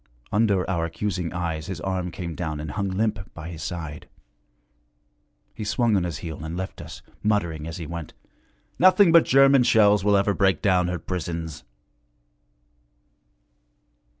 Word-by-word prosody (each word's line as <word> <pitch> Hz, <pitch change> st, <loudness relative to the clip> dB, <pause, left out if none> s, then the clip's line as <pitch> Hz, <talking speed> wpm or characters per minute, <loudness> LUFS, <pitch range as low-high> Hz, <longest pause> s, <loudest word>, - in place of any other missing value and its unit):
Under 105 Hz, -3 st, +2 dB
our 85 Hz, -3 st, -1 dB
accusing 90 Hz, 0 st, -3 dB
eyes 85 Hz, -3 st, -3 dB
his 95 Hz, -5 st, -5 dB
arm 95 Hz, -1 st, -2 dB
came 85 Hz, 0 st, -6 dB
down 80 Hz, -3 st, -4 dB
and 75 Hz, -1 st, -5 dB
hung 100 Hz, +2 st, -2 dB
limp 105 Hz, 0 st, -2 dB
by 85 Hz, 0 st, -7 dB
his 80 Hz, -2 st, -8 dB
side. 80 Hz, -4 st, -6 dB, 1.4 s
He 105 Hz, -, -6 dB
swung 115 Hz, +1 st, +1 dB
on 95 Hz, -3 st, +1 dB
his 85 Hz, -5 st, -4 dB
heel 80 Hz, -1 st, -6 dB
and 80 Hz, +2 st, -5 dB
left 95 Hz, +1 st, -5 dB
us, -, -, -10 dB, 0.2 s
muttering 85 Hz, -8 st, -1 dB
as 80 Hz, -, -6 dB
he 85 Hz, -, -6 dB
went, 85 Hz, 0 st, -7 dB, 0.6 s
'Nothing 185 Hz, 0 st, +6 dB
but 170 Hz, -1 st, +6 dB
German 135 Hz, 0 st, +5 dB
shells 105 Hz, -4 st, +4 dB
will 100 Hz, 0 st, +4 dB
ever 100 Hz, +1 st, +2 dB
break 95 Hz, -4 st, +2 dB
down 90 Hz, -3 st, +2 dB
her 90 Hz, 0 st, -2 dB
prisons.' 85 Hz, -3 st, -5 dB
90 Hz, 150 wpm, -24 LUFS, 80-105 Hz, 1.4 s, Nothing